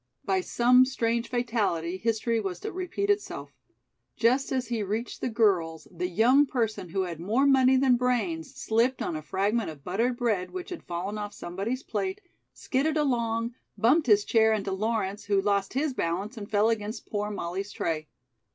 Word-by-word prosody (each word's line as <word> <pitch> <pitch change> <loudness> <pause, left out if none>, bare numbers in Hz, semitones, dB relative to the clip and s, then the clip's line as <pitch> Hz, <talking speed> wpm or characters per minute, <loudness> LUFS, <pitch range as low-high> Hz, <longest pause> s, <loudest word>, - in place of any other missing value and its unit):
By 190 -1 +1
some 250 +6 +5
strange 235 -3 -1
fatality, 210 -9 -1
history 230 +2 0
was 190 -4 -4
to - - -4
repeat 375 +3 -1
itself. 410 0 -3 0.6
Just 255 +4 +2
as 260 -1 0
he 235 -2 -1
reached 215 +4 -3
the - - -1
girls, 185 -8 +1
the 180 0 -3
young 250 +10 +4
person 220 -8 -2
who 190 +3 -1
had 175 -4 -4
more 220 +10 +1
money 265 -1 +5
than 260 -2 +4
brains 220 -10 -1
slipped 235 +4 +1
on 165 - -2
a 155 - -4
fragment 200 +6 0
of 145 -3 -10
buttered 230 +7 0
bread 215 -7 0
which 370 0 -7
had 355 - -5
fallen 185 +5 -3
off 205 0 -5
somebody's 200 +10 -4
plate, 380 +1 -3 0.3
skidded 300 +4 -1
along, 235 -5 0 0.2
bumped 265 +6 +3
his 210 -2 +5
chair 220 -1 +4
into 200 -2 -2
Lawrence, 205 0 -2
who 200 -1 +2
lost 200 0 0
his 285 0 0
balance 195 +4 -2
and 205 -3 -8
fell 210 +2 +3
against 215 0 -4
poor 210 0 -2
Molly's 195 0 -4
tray. 155 -2 -2
220 Hz, 175 wpm, -27 LUFS, 195-250 Hz, 0.6 s, some